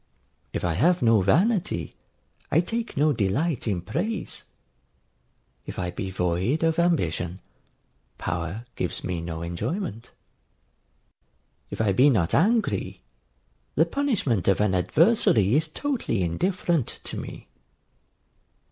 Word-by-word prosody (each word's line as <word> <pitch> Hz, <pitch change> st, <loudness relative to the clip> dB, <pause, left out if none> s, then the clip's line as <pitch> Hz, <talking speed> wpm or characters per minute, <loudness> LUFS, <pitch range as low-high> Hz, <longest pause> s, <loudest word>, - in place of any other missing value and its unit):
If -, -, -3 dB
I 85 Hz, -, +1 dB
have 170 Hz, -, +2 dB
no 115 Hz, -3 st, +5 dB
vanity, 165 Hz, -, +1 dB, 0.6 s
I 155 Hz, -, +5 dB
take 230 Hz, +4 st, -3 dB
no 150 Hz, +1 st, +4 dB
delight 120 Hz, -, 0 dB
in 95 Hz, -5 st, 0 dB
praise: 215 Hz, -, -3 dB, 1.2 s
if -, -, -7 dB
I 90 Hz, -1 st, -2 dB
be 95 Hz, +2 st, -4 dB
void 95 Hz, -, 0 dB
of 165 Hz, +1 st, +2 dB
ambition, 95 Hz, -, 0 dB, 0.8 s
power 90 Hz, +7 st, -4 dB
gives 90 Hz, -, -3 dB
me 90 Hz, -2 st, -3 dB
no 85 Hz, -1 st, -5 dB
enjoyment: 115 Hz, -, -4 dB, 1.6 s
if -, -, -7 dB
I 110 Hz, -3 st, +2 dB
be 130 Hz, +9 st, +5 dB
not 95 Hz, -9 st, +1 dB
angry, 220 Hz, +4 st, +1 dB, 0.7 s
the -, -, +4 dB
punishment 205 Hz, -, 0 dB
of 100 Hz, -, +3 dB
an 105 Hz, -2 st, +2 dB
adversary 115 Hz, -, +3 dB
is 155 Hz, +3 st, +3 dB
totally 190 Hz, -, -2 dB
indifferent 170 Hz, -, 0 dB, 0.2 s
to -, -, -5 dB
me. -, -, -8 dB
115 Hz, 120 wpm, -25 LUFS, -, 1.6 s, no